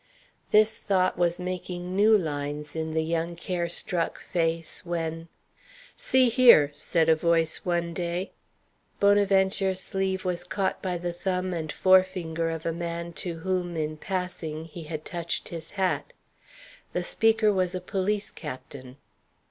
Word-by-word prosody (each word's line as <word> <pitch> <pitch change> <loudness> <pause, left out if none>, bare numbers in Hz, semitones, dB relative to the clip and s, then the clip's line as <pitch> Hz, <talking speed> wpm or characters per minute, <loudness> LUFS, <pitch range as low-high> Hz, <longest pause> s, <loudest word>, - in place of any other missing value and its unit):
This 215 +1 +4
thought 185 -2 +1
was 175 -1 +1
making 180 0 -4
new 215 +2 +6
lines 145 -3 -4
in 160 0 -3
the 160 - +2
young 165 +1 -2
care 175 0 -2
struck 175 -1 0
face, 165 -2 -2
when 165 -1 -3 0.7
"See 260 - +3
here," 235 - +7
said 165 +2 +1
a 160 - +6
voice 165 0 +2
one 170 -1 0
day. 175 +2 -3 0.7
Bonaventure's 195 -1 +3
sleeve 190 0 -2
was 175 -1 -1
caught 190 +2 -2
by 180 -2 -2
the 175 0 -3
thumb 185 +1 -2
and 160 -2 -3
forefinger 185 -3 +2
of 165 -1 -5
a 165 - 0
man 170 0 -4
to 175 -2 -4
whom, 180 -1 -1
in 155 0 -2
passing, 165 -3 -4
he 165 0 -9
had 155 0 -6
touched 170 -1 -3
his 165 -1 -7
hat. 190 - 0 0.8
The - - -1
speaker 225 -1 +3
was 185 -1 0
a - - -1
police 200 +3 -2
captain. 130 -3 -9
175 Hz, 145 wpm, -27 LUFS, 165-190 Hz, 0.8 s, here